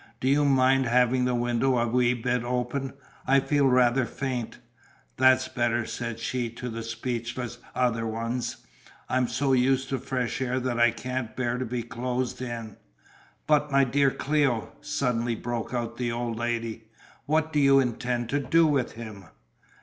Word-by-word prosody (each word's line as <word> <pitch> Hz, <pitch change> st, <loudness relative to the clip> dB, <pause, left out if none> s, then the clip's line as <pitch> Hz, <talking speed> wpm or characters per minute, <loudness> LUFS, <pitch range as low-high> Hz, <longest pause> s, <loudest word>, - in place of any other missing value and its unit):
Do 130 Hz, -, -1 dB
you 145 Hz, +2 st, +4 dB
mind 135 Hz, -1 st, +4 dB
having 125 Hz, +1 st, +3 dB
the 125 Hz, -1 st, +1 dB
window 120 Hz, +2 st, +1 dB
a 120 Hz, -, +2 dB
wee 125 Hz, +1 st, +2 dB
bit 125 Hz, 0 st, -1 dB
open? 125 Hz, +2 st, -2 dB, 0.3 s
I 135 Hz, +1 st, +5 dB
feel 140 Hz, 0 st, +2 dB
rather 125 Hz, -1 st, +3 dB
faint." 130 Hz, -4 st, -4 dB, 0.6 s
"That's 130 Hz, 0 st, +5 dB
better," 120 Hz, -1 st, 0 dB
said 115 Hz, -1 st, -4 dB
she 120 Hz, +1 st, -2 dB
to 120 Hz, +2 st, -6 dB
the 115 Hz, 0 st, -5 dB
speechless 120 Hz, +1 st, -4 dB, 0.2 s
other 115 Hz, -3 st, +1 dB
ones, 115 Hz, +2 st, -3 dB, 0.4 s
"I'm 125 Hz, -1 st, +2 dB
so 135 Hz, +2 st, 0 dB
used 130 Hz, +1 st, +2 dB
to 135 Hz, -, -1 dB
fresh 130 Hz, -1 st, -2 dB
air 130 Hz, 0 st, 0 dB
that 125 Hz, -2 st, -2 dB
I 120 Hz, 0 st, +6 dB
can't 125 Hz, 0 st, -4 dB
bear 125 Hz, -1 st, -1 dB
to 130 Hz, -, -2 dB
be 120 Hz, 0 st, -3 dB
closed 125 Hz, +1 st, -3 dB
in." 115 Hz, -4 st, -6 dB, 0.7 s
"But 150 Hz, -1 st, +2 dB
my 140 Hz, 0 st, +5 dB
dear 135 Hz, +2 st, +3 dB
Cléo," 135 Hz, -5 st, 0 dB
suddenly 125 Hz, -6 st, -1 dB
broke 120 Hz, 0 st, -4 dB
out 120 Hz, -2 st, -3 dB
the 120 Hz, -2 st, -1 dB
old 120 Hz, -1 st, -2 dB
lady, 115 Hz, -1 st, -3 dB, 0.4 s
"what 160 Hz, +1 st, +1 dB
do 150 Hz, -, +3 dB
you 140 Hz, -1 st, +6 dB
intend 120 Hz, -1 st, -1 dB
to 145 Hz, -, +1 dB
do 160 Hz, +5 st, +3 dB
with 140 Hz, -5 st, +1 dB
him?" 110 Hz, -4 st, -9 dB
125 Hz, 165 wpm, -27 LUFS, 120-130 Hz, 0.7 s, I